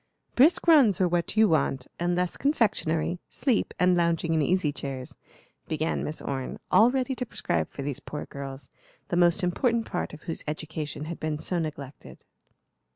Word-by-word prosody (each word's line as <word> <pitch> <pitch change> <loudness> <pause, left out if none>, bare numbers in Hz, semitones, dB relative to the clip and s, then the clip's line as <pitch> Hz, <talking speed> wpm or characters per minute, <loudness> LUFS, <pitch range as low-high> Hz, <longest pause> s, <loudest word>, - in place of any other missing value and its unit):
"Brisk 305 +8 +4
runs 270 - +6
are 185 - +4
what 175 +4 -1
you 220 0 +6
want, 140 -6 +1
and 175 +1 +1
less 180 0 -1
confectionery, 180 - +1
sleep, 240 -3 0
and 180 0 +4
lounging 170 -1 +1
in 160 - +2
easy 165 0 +1
chairs;" 135 -3 -6 0.5
began 155 0 -1
Miss 155 - -5
Orne, 135 -2 -4
all 225 +2 +7
ready 265 0 0
to 250 - -3
prescribe 85 - -2
for 140 - -7
these 140 -1 -3
poor 150 - -6
girls, 135 0 -8 0.4
the 175 - 0
most 175 +2 +3
important 230 +6 +1
part 180 - -3
of 150 - -12
whose 165 - -5
education 155 -1 -4
had 170 +1 -6
been 155 -1 -2
so 175 +3 -1
neglected. 145 -4 -7
170 Hz, 170 wpm, -27 LUFS, 150-200 Hz, 0.5 s, all